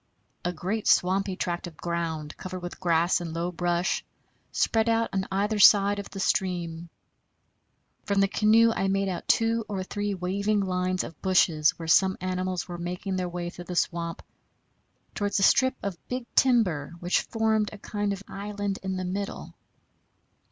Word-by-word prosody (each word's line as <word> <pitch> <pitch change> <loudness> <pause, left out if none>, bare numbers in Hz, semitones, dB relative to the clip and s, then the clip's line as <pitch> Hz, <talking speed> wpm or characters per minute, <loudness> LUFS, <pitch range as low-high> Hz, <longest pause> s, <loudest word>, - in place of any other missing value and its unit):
A 175 - 0
great 190 +6 -3
swampy 190 +1 +3
tract 175 -1 -3
of 160 -3 -12
ground, 165 -3 -3
covered 185 -1 -7
with 175 - -7
grass 170 0 +2
and 165 -2 -5
low 170 +2 -2
brush, 175 +1 0 0.5
spread 225 0 +1
out 230 0 +2
on 190 0 -1
either 205 +2 0
side 205 0 +6
the 200 0 -7
stream. 175 -3 -1 1.2
From 200 -1 +1
the 195 - +4
canoe 220 +3 +4
I 195 -3 -1
made 195 0 +1
out 180 - -5
two 225 0 +2
or 195 -2 -2
three 205 +1 -3
waving 200 +3 0
lines 185 -1 -1
of 165 - -10
bushes 165 -5 +3
where 165 - -7
some 190 +3 +4
animals 185 -1 -2
were 175 -1 -6
making 180 +2 -3
their 180 -1 -2
way 175 0 -4
through 175 - -10
the 180 - -6
swamp 170 -1 -1 0.9
towards 205 0 -1
a 195 - +2
strip 260 +4 +4
of 195 -4 -4
big 250 -1 -4
timber 185 - +2
which 175 +1 +1
formed 220 -2 0
a 215 - -9
kind 205 0 -3
of 200 0 -5
island 205 0 -4
in 190 -1 -3
the 185 - -3
middle. 195 +2 -4
190 Hz, 165 wpm, -27 LUFS, 175-205 Hz, 1.2 s, side